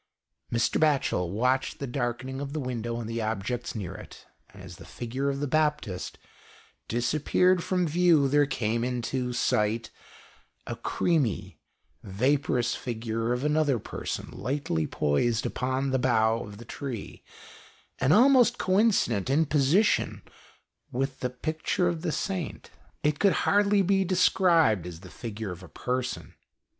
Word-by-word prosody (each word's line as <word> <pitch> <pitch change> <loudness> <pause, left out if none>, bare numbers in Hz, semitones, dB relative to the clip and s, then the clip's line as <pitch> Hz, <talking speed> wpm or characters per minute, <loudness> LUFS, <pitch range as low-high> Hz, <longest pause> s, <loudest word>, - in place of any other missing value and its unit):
Mr. 115 - +1
Batchel 140 - +2
watched 125 +7 0
the 140 - -4
darkening 130 +1 -3
of 140 0 -5
the 155 - -2
window 120 -3 -3
and 115 - -5
the 115 0 -3
objects 110 +3 -3
near 100 -5 -4
it, - - -12 0.3
and - - -13
as - - -10
the - - -12
figure 130 +4 -3
of 140 0 -2
the 145 - -1
Baptist 150 -10 -1 0.7
disappeared 155 +9 +2
from 180 -2 0
view 165 -3 +4
there 145 +1 +3
came 115 -4 -1
into 125 +1 -2
sight 110 -1 0 0.7
a - - -4
creamy 155 - -1 0.4
vaporous 125 +3 0
figure 115 -1 -3
of 125 +2 -1
another 150 -3 +2
person - - -5
lightly 105 - -2
poised 110 +11 0
upon 130 +1 -1
the 130 - +1
bough 115 -3 +2
of 105 -1 -10
the 120 - -11
tree, 120 -2 -7 0.8
and 135 - +2
almost 245 +3 +6
coincident 185 - +2
in 150 +4 +3
position 155 +8 +2 0.7
with 135 +1 -2
the 125 - -1
picture 155 +7 -1
of 170 -2 -1
the 170 -2 -1
Saint. 185 0 -3
GHOST - - -18 0.3
TALES. 150 - +3
It 145 - -20
could 200 -2 +4
hardly 205 0 +3
be 195 +1 +2
described 170 - +3
as 85 -1 -9
the 95 -3 -12
figure 110 +1 -6
of 90 +1 -8
a 90 - -12
person. 125 +7 -3
130 Hz, 150 wpm, -27 LUFS, 115-155 Hz, 0.8 s, almost